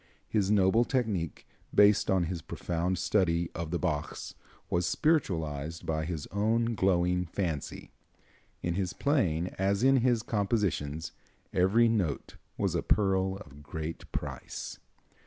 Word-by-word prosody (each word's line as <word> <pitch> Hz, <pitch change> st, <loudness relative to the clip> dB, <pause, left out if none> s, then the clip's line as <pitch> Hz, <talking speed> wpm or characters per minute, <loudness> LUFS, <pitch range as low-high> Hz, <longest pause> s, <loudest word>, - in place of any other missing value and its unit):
His 100 Hz, -3 st, +1 dB
noble 105 Hz, +2 st, +4 dB
technique, 110 Hz, -, -2 dB, 0.3 s
based 105 Hz, 0 st, +5 dB
on 95 Hz, -2 st, +3 dB
his 85 Hz, 0 st, -3 dB
profound 90 Hz, +3 st, -2 dB
study 85 Hz, -4 st, +1 dB
of 85 Hz, -1 st, -4 dB
the 85 Hz, -, 0 dB
Bachs, 75 Hz, -2 st, -3 dB, 0.3 s
was 85 Hz, 0 st, 0 dB
spiritualized 85 Hz, -, 0 dB
by 80 Hz, -1 st, -1 dB
his 80 Hz, -3 st, -4 dB
own 115 Hz, +3 st, +1 dB
glowing 90 Hz, -3 st, +2 dB
fancy. 85 Hz, -5 st, -3 dB, 0.7 s
In 85 Hz, -, 0 dB
his 95 Hz, 0 st, -1 dB
playing, 90 Hz, -, +1 dB
as 100 Hz, +3 st, +1 dB
in 135 Hz, +1 st, +6 dB
his 120 Hz, -2 st, +2 dB
compositions, 100 Hz, -9 st, -1 dB, 0.4 s
every 100 Hz, +6 st, +4 dB
note 95 Hz, -11 st, -1 dB, 0.2 s
was -, -, 0 dB
a -, -, +1 dB
pearl 95 Hz, -1 st, +2 dB
of 75 Hz, -1 st, -14 dB
great 80 Hz, +2 st, -6 dB
price. -, -, -5 dB
95 Hz, 130 wpm, -30 LUFS, 85-105 Hz, 0.7 s, in